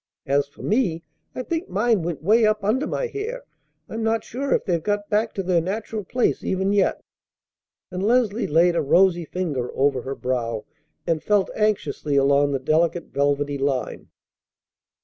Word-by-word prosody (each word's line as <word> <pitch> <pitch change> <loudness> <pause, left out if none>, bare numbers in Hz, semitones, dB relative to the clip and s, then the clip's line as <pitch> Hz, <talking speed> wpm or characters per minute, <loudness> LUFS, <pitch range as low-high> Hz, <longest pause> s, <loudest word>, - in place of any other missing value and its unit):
As 140 +1 +1
for 140 - -14
me 190 -8 0 0.3
I 255 - -3
think 330 +5 -3
mine 210 +1 +2
went 165 -3 -4
way 220 +6 +4
up 215 -1 +2
under 250 +9 +1
my - - -2
hair. 465 +3 -5 0.4
I'm 225 - -5
not 225 0 0
sure 275 +4 -4
if - - +2
they've 170 -4 0
got 205 +4 -2
back 215 +2 +2
to 195 - -2
their 180 -2 +2
natural 210 +4 -4
place 245 +6 0
even 190 +1 0
yet!" 200 -2 +1 0.9
And 185 - -4
Leslie 230 0 +2
laid 170 +3 +3
a - - +2
rosy 175 +3 +3
finger 150 -9 -3
over 135 -1 +2
her 135 +2 -5
brow, 120 -4 -2 0.4
and 165 -2 0
felt 205 -2 +1
anxiously 170 -9 0
along 140 +1 +3
the 140 - +1
delicate 165 +5 0
velvety 145 0 0
line. 135 -2 -2
185 Hz, 170 wpm, -23 LUFS, 145-215 Hz, 0.9 s, way